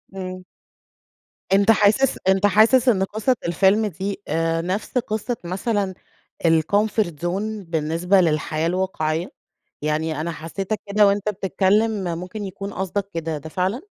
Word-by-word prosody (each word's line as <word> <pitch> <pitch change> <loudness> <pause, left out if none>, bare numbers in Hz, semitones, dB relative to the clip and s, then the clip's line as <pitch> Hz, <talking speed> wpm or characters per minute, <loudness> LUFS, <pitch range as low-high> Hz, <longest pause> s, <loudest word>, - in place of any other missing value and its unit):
إمم. 185 -1 -6 1.1
أنت 200 +2 +5
حاسس 220 +5 +3
أنت 190 +1 +4
حاسس 225 +6 +5
إن 195 -5 +3
قصّة 220 +6 0
الفيلم 195 +5 +3
دي 195 +2 -4
آآ، 165 +1 0
نفس 190 +8 -3
قصّة 230 +1 -2
مثلًا 195 +2 -1 0.5
الcomfort 200 +4 +2
zone 205 +3 -3
بالنسبة 165 +4 +2
للحياة 155 -1 0
الواقعيّة؟ 175 -2 -1 0.5
يعني 155 0 -1
أنا 170 +2 -2
حسيتك 190 +6 -4
كده 205 0 +4
وأنت 200 +1 +1
بتتكلّم 195 -1 +1
ممكن 185 +4 -6
يكون 195 +1 -6
قصدك 195 +1 -3
كده 165 -2 -3
ده 155 +2 -9
فعلًا؟ 190 - -1
190 Hz, 130 wpm, -22 LUFS, 170-210 Hz, 1.1 s, أنت